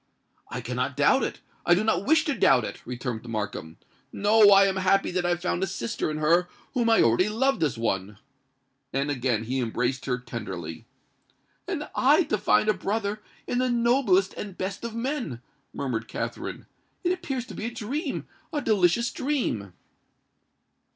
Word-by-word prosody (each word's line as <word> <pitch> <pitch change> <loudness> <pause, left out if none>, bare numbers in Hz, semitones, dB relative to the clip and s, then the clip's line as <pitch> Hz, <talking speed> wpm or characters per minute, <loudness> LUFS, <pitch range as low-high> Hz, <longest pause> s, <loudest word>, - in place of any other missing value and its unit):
"I - - -4
cannot - - -3
doubt - - +4
it—I 175 - -1
do 195 - +1
not 215 -2 +1
wish 320 +1 +4
to 295 - +1
doubt 135 - +4
it," - - -6
returned 125 -2 -4
Markham. 105 -7 -4 0.3
"No—I 205 -1 +6
am 195 -1 0
happy 190 +1 +2
that 180 -1 0
I - - +1
have 175 0 -1
found 180 - 0
a 190 - +1
sister 155 -6 -3
in 155 - -3
her 170 +4 +3 0.2
whom 240 -3 +1
I 225 - +5
already 120 - +3
loved 265 +6 +1
as 150 -7 +1
one!" 100 -3 -2 0.7
And 140 +2 0
again 125 -5 0
he 130 +4 -2
embraced 125 +2 -1
her 125 -2 +1
tenderly. 95 -9 -7 0.8
"And - - -3
I - - +4
to - - -1
find 105 0 +3
a 215 - +4
brother 205 +2 -2 0.2
in 245 - -1
the 255 0 +1
noblest 235 -5 +3
and 200 -3 -7
best 195 +3 -4
of 230 -1 -5
men!" 240 - -3 0.3
murmured 115 -5 -3
Katherine: - - -5 0.4
"it 355 - +2
appears 275 -9 -3
to - - -10
be 215 - -5
a 235 - -2
dream—a 280 - -4
delicious 215 +3 +2
dream!" 240 - -2
185 Hz, 165 wpm, -26 LUFS, -, 0.8 s, No—I